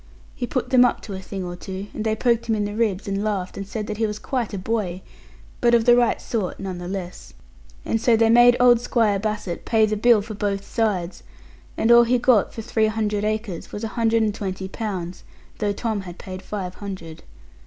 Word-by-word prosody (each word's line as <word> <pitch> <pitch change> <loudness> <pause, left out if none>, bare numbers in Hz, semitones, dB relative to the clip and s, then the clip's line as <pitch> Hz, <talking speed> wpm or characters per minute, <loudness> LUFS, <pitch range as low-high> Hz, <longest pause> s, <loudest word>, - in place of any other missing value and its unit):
He 245 - -3
put 255 - -2
them 255 -1 +7
up 245 - +1
to 205 - -8
a 190 - -5
thing 190 0 -6
or 175 0 -5
two; 190 +2 -6
and 215 - -4
they 220 -1 +1
poked 235 0 +1
him 225 - +2
in 210 -1 -1
the 205 - -4
ribs, 210 -3 -1
and 200 +1 -1
laughed, 200 -4 -2
and 195 -1 -6
said 210 +1 -4
that 210 - -5
he 225 0 +1
was 210 0 -4
quite 245 -1 -3
a 200 - -4
boy; 190 -2 -2 0.6
but 240 -1 +4
of 230 -1 +2
the 240 - +7
right 240 -1 +2
sort, 210 -6 -3
none 190 -2 -5
the 175 - -6
less. 180 - -7 0.5
And 225 - 0
so 230 -1 +4
they 225 0 +4
made 240 +1 +7
old 245 -1 +6
Squire 220 -5 +1
Bassett 210 -4 -3
pay 220 -1 +3
the 215 0 -1
bill 220 0 +4
for 215 - -7
both 200 -1 -2
sides; 200 -6 -1 0.6
and 225 - +3
all 235 0 +8
he 250 +2 +3
got 240 -4 +3
for 225 - -7
three 220 -1 +1
hundred 210 -1 -1
acres 215 -4 -3
was 205 - -6
a 225 - -2
hundred 225 +1 +1
and 210 -1 0
twenty 190 -2 -4
pounds; 185 -4 -5 0.4
though 210 -1 +1
Tom 215 0 -2
had 180 -2 -9
paid 185 -1 -8
five 190 -2 -5
hundred. 185 -6 -7
210 Hz, 230 wpm, -23 LUFS, 195-230 Hz, 0.6 s, all